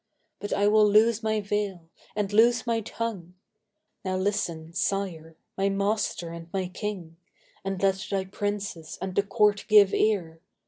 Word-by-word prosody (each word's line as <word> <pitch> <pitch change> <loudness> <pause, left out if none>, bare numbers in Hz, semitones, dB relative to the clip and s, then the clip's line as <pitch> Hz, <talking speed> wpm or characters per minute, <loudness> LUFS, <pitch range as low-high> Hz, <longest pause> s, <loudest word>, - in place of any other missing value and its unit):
But 205 - -6
I 205 0 +2
will 210 0 +5
loose 220 +2 +4
my 220 -1 0
veil 200 -4 -3 0.3
and 205 -1 -2
loose 235 +2 +4
my 230 -1 +1
tongue! 205 -6 -5 0.7
Now 185 -1 -1
listen, 170 -5 -2
sire—my 185 0 -2
master 200 -3 -1
and 170 0 -9
my 185 -1 -2
king; 185 -4 -6 0.5
And 195 -1 -3
let 195 +1 +1
thy 195 -1 -1
princes 200 -4 -4
and 190 -1 -4
the 200 - +3
court 205 0 +2
give 205 -2 +6
ear! 175 -7 0
200 Hz, 145 wpm, -27 LUFS, 180-210 Hz, 0.7 s, give